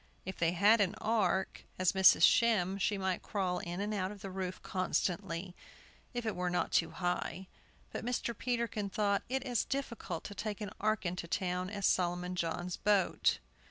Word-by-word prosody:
If 190 0 -6
they 170 0 +2
had 205 +5 +5
an 200 +1 +1
ark, 195 -4 0
as 185 -1 +3
Mrs. 190 -1 +6
Shem 200 -5 +4
she 205 +1 +1
might 190 -1 -1
crawl 185 -3 -1
in 175 +1 -5
and 205 +1 -2
out 190 -2 -1
of 205 -2 -10
the 195 - -5
roof 185 -1 -4
constantly, 180 -1 -2 0.6
if 240 -2 -4
it 220 - -1
were 180 0 -1
not 175 - 0
too 165 - +3
high. 180 +1 -2 0.5
But - - -5
Mr. 240 -1 -2
Peterkin 235 -4 -2
thought 200 0 +1
it 265 0 -1
as 245 -5 0
difficult 235 -11 -4
to 205 - -7
take 210 0 -4
an 210 -2 -5
ark 215 -1 +1
into 175 -1 -3
town 180 +1 -1
as 200 -1 -3
Solomon 180 0 +1
John's 175 +1 -2
boat. 205 -3 +2
190 Hz, 180 wpm, -33 LUFS, 180-210 Hz, 0.6 s, Mrs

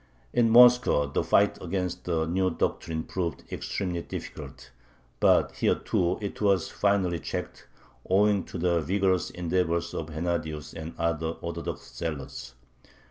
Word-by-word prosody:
In 115 -1 +4
Moscow 120 -9 +6
the 70 - -1
fight 100 0 +3
against 90 0 -3
the 80 -2 0
new 95 +3 +1
doctrine 80 -1 -2
proved 85 -3 -3
extremely 90 -3 -3
difficult. 65 - -8 0.5
But - - +4
here - - +1
too 90 0 0
it 100 - -5
was 100 -5 +2
finally 95 -4 +1
checked, - - -6 0.4
owing 100 0 +3
to - - -7
the 85 -1 +1
vigorous 95 +2 +1
endeavors 85 -1 -1
of 80 - -4
Hennadius 80 -1 -3
and 80 0 -7
other 85 -1 0
Orthodox 85 -6 -6
zealots. 70 -5 -5
85 Hz, 135 wpm, -27 LUFS, 80-95 Hz, 0.5 s, Moscow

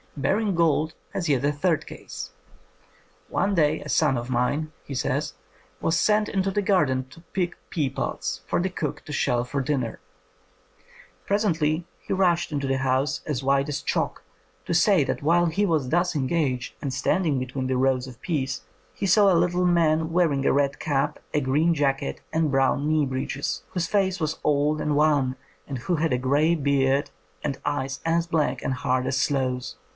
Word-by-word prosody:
Baring 195 +8 +1
Gould 160 -1 +2 0.2
has 175 -4 -2
yet 140 -2 +2
a 145 - +3
third 155 +2 0
case. - - -8 1.0
''One 200 0 +1
day 155 -2 +2
a - - -8
son 150 -5 +2
of 120 +2 -4
mine," 145 +6 0
he 140 - -7
says, 125 - -1 0.5
"was 165 - +1
sent 210 0 +3
into 195 0 0
the 205 - 0
garden 135 -10 +2
to 165 - -14
pick 180 -2 -1
pea 150 -6 0
pods - - -3
for - - +1
the 185 +2 0
cook 185 - -4
to 150 - -7
shell 120 -3 +1
for 140 +2 -2
dinner. 130 -4 -2 1.3
Presently 170 -6 +1 0.2
he - - -3
rushed 175 -3 +2
into 140 -2 -2
the 135 0 0
house 130 +2 0
as 140 -4 -2
white 140 +2 +2
as 145 - -2
chalk - - -2 0.4
to - - -2
say 175 -1 +4
that - - -2
while 170 +4 +3
he 175 +5 +1
was 155 -7 0
thus 175 +2 +1
engaged, 135 -3 -1
and 140 - -2
standing 150 +2 +1
between 130 +1 -3
the 130 0 0
rows 130 -1 +2
of 125 -2 -11
peas, 135 - -2 0.3
he - - -3
saw 200 +1 +5
a 175 - +4
little 180 +1 +2
man 160 -2 +3
w^earing 165 -5 +2
a - - +4
red 140 0 +1
cap, 140 -2 -1
a 150 - +3
green 150 +5 +2
jacket, 140 -3 -1
and 160 -2 +1
brown 135 +1 +2
knee 155 -2 +3
breeches, 130 +1 -3
whose 175 -2 -2
face 195 -2 +1
was 155 -1 -2
old 150 +1 +2
and 150 -1 0
wan, 145 -4 +3 0.3
and 135 - -4
who 125 +9 -1
had 160 0 0
a 125 - +2
grey 145 +6 +2
beard 140 -2 +1 0.3
and 140 -2 -2
eyes 135 -2 -2
as 165 +1 +1
black 150 -6 0
and 135 - -1
hard 125 0 0
as 130 0 0
sloes. 130 -2 -1
150 Hz, 185 wpm, -25 LUFS, 135-170 Hz, 1.3 s, saw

